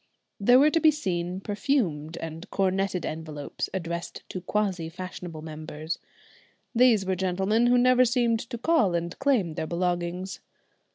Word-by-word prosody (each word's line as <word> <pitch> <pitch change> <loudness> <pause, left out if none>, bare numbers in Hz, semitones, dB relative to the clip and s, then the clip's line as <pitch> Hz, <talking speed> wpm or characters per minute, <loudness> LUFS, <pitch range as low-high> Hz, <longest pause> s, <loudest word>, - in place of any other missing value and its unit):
There 245 +5 +6
were 295 +3 +6
to 330 - +3
be 315 - +6
seen 185 - -2
perfumed 195 - -1
and 165 +1 -7
coronetted 190 -2 0
envelopes 155 -2 -5
addressed 170 -2 -4
to 185 - -5
quasi 185 -4 -1
fashionable 175 -2 -7
members. 155 0 -5 0.7
These 235 -5 +5
were 190 0 0
gentlemen 190 +5 +1
who 245 +1 +5
never 255 +1 +5
seemed 240 -2 +2
to 235 +1 -6
call 235 - +2
and 170 0 -2
claim 250 - +2
their 160 - -3
belongings. 175 +1 -2
185 Hz, 145 wpm, -27 LUFS, 170-235 Hz, 0.7 s, There